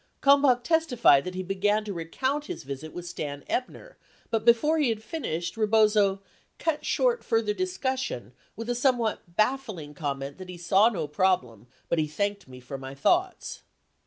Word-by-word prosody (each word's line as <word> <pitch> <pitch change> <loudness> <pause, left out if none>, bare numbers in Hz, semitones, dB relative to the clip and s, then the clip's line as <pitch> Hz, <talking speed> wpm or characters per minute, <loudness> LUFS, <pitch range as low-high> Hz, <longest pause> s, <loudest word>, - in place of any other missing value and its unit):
Kalmbach 275 -3 +5
testified 245 - +4
that 185 0 -5
he 185 - -3
began 205 +3 +1
to 205 - -4
recount 260 - -2
his - - -6
visit 140 +3 -7
with 175 - -7
Stan 145 -4 -5
Ebner, - - -4 0.3
but 225 -1 0
before 295 +8 +4
he 290 -5 +3
had 220 -1 -2
finished, 175 - -4
Rebozo 210 -3 +3 0.3
"cut 320 -3 -1
short - - +1
further 225 -2 +1
discussion 260 - -3 0.2
with 230 +2 -6
a 245 - +1
somewhat 240 -8 0
baffling 215 - -1
com 145 -2 -3
ment 140 +4 -7
that 185 -1 -9
he 180 - -7
saw 195 +5 +4
no 170 -9 -3
problem 145 - 0 0.2
but 170 - +1
he 155 - +1
thanked 200 +5 -2
me 130 -1 -11
for 130 +2 -7
my 135 +1 -8
thoughts." 360 - 0
205 Hz, 170 wpm, -27 LUFS, 160-255 Hz, 0.3 s, Kalmbach